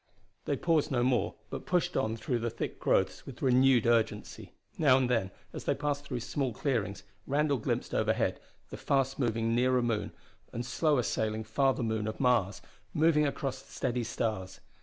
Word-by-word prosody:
They 140 - 0
paused 160 -1 +2
no 120 -4 +1
more, 125 -1 +1 0.2
but - - -6
pushed 180 -2 +1
on 110 -3 0
through 120 +1 -1
the 120 +1 -1
thick - - -5
growths - - +1
with 135 -1 -9
renewed 130 -2 +4
urgency. 110 -3 0 0.3
Now 140 -5 +6
and 130 -1 +2
then, 115 -6 +1 0.2
as - - -7
they - - +1
passed 145 -1 -2
through 125 -3 -4
small 130 0 -2
clearings, 105 -7 -2 0.2
Randall 145 -1 +1
glimpsed - - -2
overhead - - +1 0.3
the - - -6
fast 135 -1 0
moving 115 -2 0
nearer 125 +1 +3
moon 115 -3 -1 0.4
and 120 +1 -4
slower 140 +1 +2
sailing 110 -1 -1
farther 130 +3 +1
moon 110 -1 -1
of 110 - -5
Mars, 105 -6 +2 0.3
moving 150 -1 +4
across 135 -2 -3
the - - -20
steady 120 0 -1
stars. 110 -4 -3
125 Hz, 175 wpm, -30 LUFS, 110-135 Hz, 0.4 s, Now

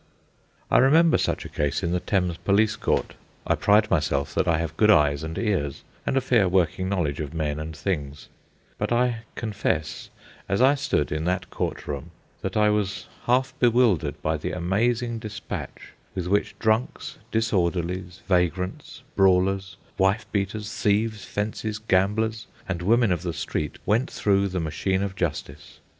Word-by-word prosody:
I - - +6
remember 160 +6 +5
such - - -1
a - - -4
case 75 -1 -1
in 85 - 0
the 90 - +1
Thames 90 -3 0
Police 105 +3 +2
Court. - - -1 0.3
I - - +2
pride 105 +1 +3
myself 75 -5 +1
that - - +1
I 80 - +3
have 80 -1 -3
good 105 +3 +4
eyes 75 -7 +4
and 80 +2 -5
ears, 95 -10 -1 0.2
and 135 - +1
a - - +3
fair 110 -7 +3
working 95 0 +1
knowledge 85 -8 -1
of 75 0 -5
men 75 -2 -1
and 80 0 -6
things; 75 -5 -3 0.5
but - - -1
I 120 -1 +1
confess, 100 -9 -2 0.4
as 100 - +1
I 130 +3 +6
stood 140 - 0
in 75 +1 -2
that 90 0 -1
court - - -3
room, 70 -2 -5 0.3
that - - -3
I 105 0 +4
was 100 -2 -1 0.2
half 130 +1 +2
bewildered 110 - +3
by 80 0 +1
the 75 - -4
amazing 115 +6 0
despatch 110 -1 -7 0.2
with 90 -3 -2
which 100 +3 0
drunks, 110 +3 -1
disorderlies, 90 -4 -1
vagrants, 90 0 -1
brawlers, 95 0 +2 0.2
wife 95 +3 +2
beaters, 105 +1 -2
thieves, 105 0 0
fences, 105 +1 -3
gamblers, 110 +2 0 0.2
and 90 -2 -3
women 115 +3 +3
of 85 -3 0
the 85 -2 -3
street 75 -2 -3
went 115 +6 +2
through 100 -1 +2
the 95 -1 -3
machine 95 +4 -1
of 100 -1 -4
justice. 85 -6 -4
95 Hz, 160 wpm, -25 LUFS, 85-110 Hz, 0.5 s, I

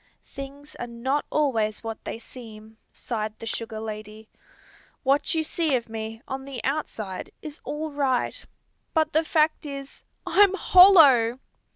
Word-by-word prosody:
"Things 280 +2 -10
are 240 - -4
not 255 +5 -2
always 225 -9 0
what 225 -1 -6
they - - -4
seem," 220 -2 -12
sighed 215 -2 -4
the - - -9
sugar 225 -1 -4
lady. 215 0 -8 0.7
"What 275 +4 +2
you 320 - +1
see 315 -2 0
of 235 -2 -3
me, 225 +1 -6
on 265 0 -5
the 275 -3 -6
outside, 225 -9 -3
is 305 -1 -8
all 305 +1 -4
right; 270 -4 0 0.5
but 315 -1 +2
the 315 +2 +3
fact 310 0 +1
is, 275 -2 -8 0.2
_I'm 395 -1 +5
hollow! 310 -13 +7
265 Hz, 145 wpm, -25 LUFS, 225-300 Hz, 0.7 s, hollow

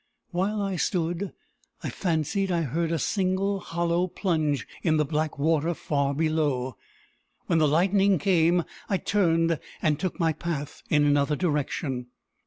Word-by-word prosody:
While 200 +4 0
I 195 -2 -2
stood, 175 +2 -1 0.5
I - - -3
fancied 185 +3 0
I 170 -1 +1
heard 160 +4 -1
a 165 - +1
single 195 +4 0
hollow 170 0 0
plunge 155 -6 -1
in 160 -3 +2
the 150 - +2
black 155 +1 -1
water 160 +3 +1
far 140 -2 -1
below. 145 -5 0 0.7
When 165 - +2
the 155 - +4
lightning 190 +5 +3
came, 170 +1 +3 0.3
I 195 - +2
turned, 165 -5 +2 0.2
and 150 -1 +1
took 185 0 -3
my 165 -2 +2
path 150 -3 -4
in 150 -1 +4
another 145 0 +3
direction. 145 -5 -1
165 Hz, 145 wpm, -26 LUFS, 150-185 Hz, 0.7 s, the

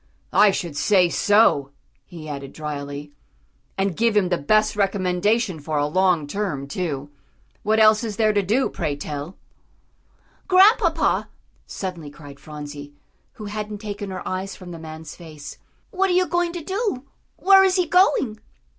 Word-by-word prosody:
"I 210 - +6
should 170 -5 -3
say 180 +3 +3
so," 205 -9 +3 0.3
he 165 -4 -11
added 140 -2 -7
drily, 145 -1 -6 0.6
"and 195 -2 0
give 230 +1 +2
him 190 -3 +2
the 175 - +1
best 215 +10 +2
recommendation 195 0 0
for 150 +1 -3
a 145 - +2
long 180 0 +2
term, 145 -5 -3
too. 145 -3 -4 0.5
What 220 +1 +1
else 215 +1 +5
is 220 -3 -4
there 215 0 +2
to 205 - +2
do, 220 +8 +1
pray 155 -4 -3
tell?" 145 +4 -6 1.1
"Grandpapa," 385 +5 +4 0.4
suddenly 175 -6 -6
cried 145 -2 -13
Phronsie, 145 -1 -9 0.4
who 215 - -9
hadn't 210 0 -5
taken 205 -1 -6
her 185 - -6
eyes 190 +1 -4
from 180 -2 -11
the 165 - -8
man's 160 0 -9
face, 155 -4 -11 0.3
"what 385 0 +1
are - - +2
you 365 +1 +3
going 350 -1 0
to 345 -3 -6
do 385 - -2 0.3
where 385 0 +6
is 380 -1 +3
he 365 -2 +2
going?" 300 - +2
190 Hz, 155 wpm, -22 LUFS, 150-220 Hz, 1.1 s, I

